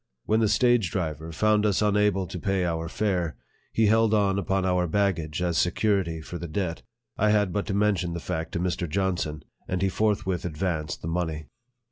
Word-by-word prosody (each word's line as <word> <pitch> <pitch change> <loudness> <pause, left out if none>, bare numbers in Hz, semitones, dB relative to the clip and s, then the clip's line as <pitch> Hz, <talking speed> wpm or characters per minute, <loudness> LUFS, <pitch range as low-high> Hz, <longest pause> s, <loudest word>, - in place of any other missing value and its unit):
When 110 +1 +2
the 110 - +3
stage 120 -2 +3
driver 80 -3 -3
found 105 +5 +2
us 105 -3 +2
unable 105 -2 +2
to 90 +1 -6
pay 95 -1 0
our 80 -1 -2
fare, 90 -6 -1 0.3
he 110 - +2
held 110 +1 +4
on 100 -2 +2
upon 95 0 0
our 90 -1 +1
baggage 85 -3 0
as 85 -2 +1
security 90 -3 +1
for 85 +2 -7
the 85 - -5
debt. 85 0 -3 0.4
I 105 - +3
had 105 -3 +2
but 100 - -1
to 100 - -1
mention 100 -4 +1
the 85 - -3
fact 80 -1 -4
to - - -1
Mr. 90 -1 -1
Johnson, 85 -4 -1 0.2
and 90 +1 -1
he 95 - +3
forthwith 100 -3 0
advanced 80 -2 -3
the - - -3
money. 80 -3 -2
90 Hz, 190 wpm, -26 LUFS, 85-105 Hz, 0.4 s, held